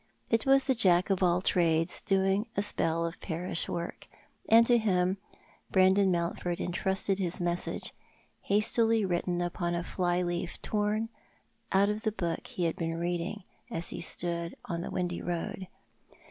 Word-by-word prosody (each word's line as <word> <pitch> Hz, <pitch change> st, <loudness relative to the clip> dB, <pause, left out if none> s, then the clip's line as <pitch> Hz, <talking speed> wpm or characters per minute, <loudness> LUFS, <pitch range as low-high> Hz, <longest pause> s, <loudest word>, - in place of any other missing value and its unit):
It 230 Hz, +2 st, +2 dB
was 270 Hz, 0 st, +6 dB
the 265 Hz, -, +2 dB
Jack 185 Hz, -5 st, +3 dB
of 195 Hz, -, +1 dB
all 180 Hz, 0 st, +3 dB
trades 165 Hz, -2 st, +2 dB
doing 195 Hz, +3 st, +1 dB
a 200 Hz, -, +2 dB
spell 165 Hz, -4 st, 0 dB
of 170 Hz, +1 st, -5 dB
parish 170 Hz, 0 st, -2 dB
work— 170 Hz, +1 st, -5 dB, 0.4 s
and 230 Hz, +1 st, +7 dB
to 240 Hz, 0 st, +4 dB
him 185 Hz, -3 st, +1 dB, 0.5 s
Brandon 190 Hz, +1 st, +4 dB
Mountford 175 Hz, 0 st, -1 dB
entrusted 190 Hz, +2 st, -1 dB
his 180 Hz, 0 st, -2 dB
message 175 Hz, 0 st, -2 dB, 0.3 s
— -, -, -37 dB
hastily 225 Hz, +1 st, +3 dB
written 175 Hz, -1 st, -1 dB
upon 175 Hz, 0 st, -2 dB
a 170 Hz, -, -2 dB
fly 180 Hz, 0 st, 0 dB
leaf 175 Hz, 0 st, -3 dB
torn 215 Hz, +1 st, 0 dB, 0.6 s
out 200 Hz, +1 st, +4 dB
of 210 Hz, +1 st, -2 dB
the 220 Hz, -, 0 dB
book 170 Hz, -5 st, -3 dB
ho 180 Hz, -, 0 dB
had 165 Hz, -1 st, 0 dB
been 165 Hz, -1 st, -2 dB
reading, 175 Hz, +4 st, -2 dB, 0.3 s
as 165 Hz, -, -1 dB
he -, -, -5 dB
stood 170 Hz, -1 st, 0 dB
on 170 Hz, -1 st, -3 dB
the -, -, -5 dB
windy 175 Hz, -1 st, -2 dB
road. 175 Hz, +2 st, -4 dB
180 Hz, 160 wpm, -30 LUFS, 170-200 Hz, 0.6 s, and